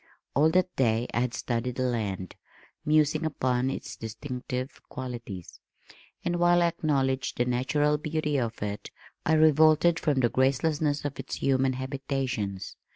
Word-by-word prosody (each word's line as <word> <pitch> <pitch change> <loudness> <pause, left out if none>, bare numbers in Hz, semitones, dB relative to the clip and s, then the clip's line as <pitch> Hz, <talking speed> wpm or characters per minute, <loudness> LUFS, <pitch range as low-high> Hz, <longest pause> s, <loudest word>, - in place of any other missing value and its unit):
All 150 +4 +4
that 180 +2 +1
day 115 -2 +2
I - - +1
had 125 -1 -1
studied 120 0 -2
the 130 - -1
land, 105 -7 -2 0.5
musing 155 +1 +3
upon 130 -4 0
its 135 - -5
distinctive 125 +3 -5
qualities, 120 -8 -7 0.7
and 175 0 0
while 175 0 +4
I 170 - +4
acknowledged 135 -5 0
the 120 - +2
natural 145 +4 +1
beauty 150 -1 -1
of 115 -3 -3
it, 105 0 -4 0.4
I 160 - +4
revolted 155 +2 +5
from 145 -4 +1
the 120 - +3
gracelessness 145 +3 +1
of 145 - -4
its - - -4
human 130 -1 +2
habitations. 130 -7 -3
135 Hz, 145 wpm, -28 LUFS, 125-150 Hz, 0.7 s, revolted